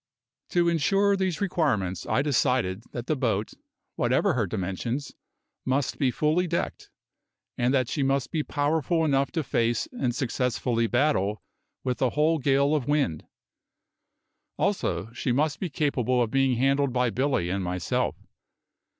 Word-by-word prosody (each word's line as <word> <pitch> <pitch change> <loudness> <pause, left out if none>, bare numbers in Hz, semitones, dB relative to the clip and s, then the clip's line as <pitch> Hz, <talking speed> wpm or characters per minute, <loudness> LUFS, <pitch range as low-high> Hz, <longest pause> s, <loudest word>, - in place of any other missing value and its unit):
To 175 -1 +2
insure 195 +5 +3
these 190 -1 -1
requirements 130 - 0
I 135 - +1
decided 125 -7 +1
that 120 -1 -5
the 155 - 0
boat, 110 -6 -1 0.4
whatever - - +2
her - - 0
dimensions, 115 +9 -3 0.5
must 130 +1 -1
be 135 - +3
fully 155 +7 +1
decked, 170 0 -3 0.7
and 120 +1 +1
that 130 -3 +2
she 145 - -2
must 135 -2 0
be 160 - 0
powerful 160 +3 0
enough 140 -2 +1
to 160 - 0
face 120 - 0
and 125 - -2
successfully 125 -2 0
battle 110 -6 +1 0.4
with 125 -2 -2
a 130 - +3
whole 155 +5 +2
gale 140 +2 +2
of 145 -5 0
wind; 145 - 0 1.3
also 190 - -1
she 125 - -2
must 145 +3 +1
be 185 - -2
capable 130 -4 0
of 115 -2 +1
being 135 -2 +2
handled 135 +1 +2
by 125 -2 +1
Billy 125 -8 0
and 95 0 -1
myself. 90 -2 -1
135 Hz, 145 wpm, -26 LUFS, 120-150 Hz, 1.3 s, insure